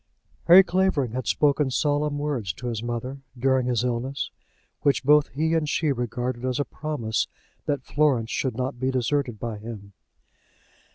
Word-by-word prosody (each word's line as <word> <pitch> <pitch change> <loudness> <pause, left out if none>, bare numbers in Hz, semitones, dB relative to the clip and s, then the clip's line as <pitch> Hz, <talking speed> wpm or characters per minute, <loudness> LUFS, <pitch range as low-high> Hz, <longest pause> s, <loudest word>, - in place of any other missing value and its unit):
Harry 180 +3 +10
Clavering 185 -9 +1
had 125 -1 -4
spoken 145 -1 +2
solemn 145 +1 0
words 140 -10 -2
to 125 - -10
his 115 -3 -2
mother, 120 +3 -4 0.2
during 130 0 +2
his 120 -2 +1
illness, 125 +3 -2 0.5
which 140 -1 +2
both 150 +2 +5
he 160 +4 -1
and 160 -2 +1
she 155 0 +1
regarded 125 0 -3
as 130 +1 -1
a 145 - +1
promise 125 -8 -2 0.4
that 145 -3 -1
Florence 135 -7 +1
should 130 -4 -1
not 130 0 -3
be 130 +1 0
deserted 130 -2 0
by 115 -2 -4
him. 105 -2 -9
130 Hz, 160 wpm, -25 LUFS, 120-145 Hz, 0.5 s, Harry